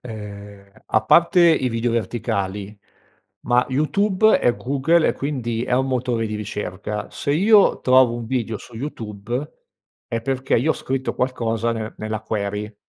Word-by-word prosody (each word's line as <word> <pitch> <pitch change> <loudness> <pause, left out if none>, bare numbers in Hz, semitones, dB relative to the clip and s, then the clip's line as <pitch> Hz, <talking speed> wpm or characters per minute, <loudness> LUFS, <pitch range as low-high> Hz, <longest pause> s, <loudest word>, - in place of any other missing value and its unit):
ehm, 100 -3 -10
a 110 0 +1
parte 170 - +5
i 145 -6 +3
video 115 0 -1
verticali, 105 -3 -3 0.7
ma 125 0 +2
YouTube 200 +9 +2
è 120 - +2
Google, 140 +6 +2
e - - +2
quindi 120 -5 -3
è 125 - -4
un 130 +1 +1
motore 125 -3 -1
di 110 - -4
ricerca. 105 0 -5
Se 140 - -3
io 205 +5 +5
trovo 130 -2 +5
un 120 -1 -5
video 115 -3 -2
su 120 - -14
YouTube 120 0 -5 0.6
è 115 -1 -2
perché 135 +1 0
io 145 +7 +2
ho - - +2
scritto 130 0 -3
qualcosa 115 -3 -1
nel 110 -1 -4
nella 110 0 -4
query 105 0 -4
120 Hz, 155 wpm, -21 LUFS, 110-130 Hz, 0.7 s, parte